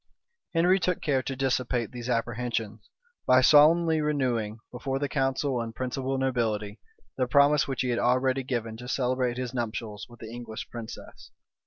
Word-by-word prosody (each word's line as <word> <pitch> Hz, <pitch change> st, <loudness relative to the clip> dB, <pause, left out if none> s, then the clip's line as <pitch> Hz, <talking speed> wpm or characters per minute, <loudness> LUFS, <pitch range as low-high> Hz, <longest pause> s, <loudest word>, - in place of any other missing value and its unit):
Henry 180 Hz, +3 st, +4 dB
took 180 Hz, -1 st, 0 dB
care 135 Hz, -4 st, +1 dB
to 135 Hz, +1 st, -4 dB
dissipate 125 Hz, -3 st, -1 dB
these 120 Hz, 0 st, -6 dB
apprehensions, 115 Hz, -2 st, -2 dB, 0.4 s
by 130 Hz, -, +6 dB
solemnly 155 Hz, +4 st, +5 dB
renewing, 125 Hz, -8 st, -1 dB
before 135 Hz, +2 st, -3 dB
the 145 Hz, +1 st, -1 dB
council 135 Hz, -2 st, 0 dB
and 115 Hz, -1 st, -6 dB
principal 130 Hz, +2 st, -2 dB
nobility, 110 Hz, -5 st, -1 dB, 0.4 s
the 130 Hz, -1 st, +1 dB
promise 145 Hz, +3 st, +4 dB
which 135 Hz, -3 st, -2 dB
he 130 Hz, -, -1 dB
had 120 Hz, -1 st, 0 dB
already 130 Hz, +2 st, +2 dB
given 120 Hz, -3 st, -3 dB
to 125 Hz, +1 st, -9 dB
celebrate 125 Hz, -1 st, 0 dB
his 125 Hz, -1 st, -4 dB
nuptials 110 Hz, -3 st, -4 dB
with 120 Hz, -1 st, -15 dB
the 110 Hz, 0 st, -9 dB
English 120 Hz, -2 st, -7 dB
princess. 115 Hz, -2 st, -9 dB
125 Hz, 160 wpm, -27 LUFS, 115-135 Hz, 0.4 s, by